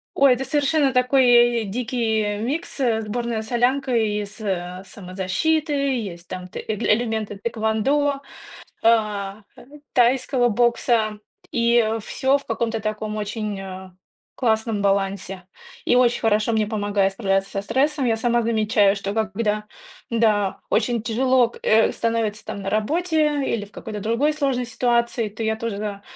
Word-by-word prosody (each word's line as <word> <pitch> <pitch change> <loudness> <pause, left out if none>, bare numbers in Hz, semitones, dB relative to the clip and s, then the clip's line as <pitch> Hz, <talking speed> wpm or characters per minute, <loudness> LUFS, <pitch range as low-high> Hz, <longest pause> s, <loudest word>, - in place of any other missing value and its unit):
Ой, 275 -1 +6
это 265 - -4
совершенно 290 -1 +1
такой 255 +1 +3 0.4
й - - -5
дикий 220 -1 -1
микс, 280 +7 -3
э, 235 -4 +2
сборная 230 +1 -3
солянка 250 +3 0
из, 210 -1 -1
э, 185 -2 -3
самозащиты. 200 - -1
Есть 235 -12 -2
там, 180 0 -7
т - - -8
э 220 - -3
элементы 215 -1 0
тхэквондо, 235 +7 0 0.6
а, 210 -3 +1 0.2
ай - - -14 0.3
тайского 250 0 +3
бокса, 235 -1 +1 0.3
и 235 -1 +2
всё 265 +5 +1
в 280 - -15
каком-то 225 0 -2
таком 215 0 -3
очень, 210 -1 -3
э, 190 -1 -8 0.5
классном 220 -3 0
балансе, 195 -1 -1 0.4
и - - +3
очень 245 -1 +3
хорошо 215 0 +2
мне 220 -1 +1
помогает 205 -2 0
справляться 195 -1 0
со 195 - -2
стрессом. 270 +6 0
Я 225 - +2
сама 240 +1 +1
замечаю, 215 -2 +2
что, 200 0 -4
как 220 -3 -1
бы, 230 - -2
да, 210 -1 -1 0.4
да, 215 -4 +1
очень 230 +1 +1
тяжело 250 +2 +2
к - - -14
э, 220 +1 +4
становится 225 -2 -1
там 200 - -5
на 195 - -3
работе 300 - +1
или 210 -3 -3
в - - -21
какой-то 215 -2 -7
другой 230 +9 +1
сложной 275 -5 -1
ситуации. 235 -1 0
То 210 +2 -7
я 220 0 0
тоже, 225 -2 -4
да, 205 -1 -5
220 Hz, 150 wpm, -22 LUFS, 210-245 Hz, 0.6 s, Ой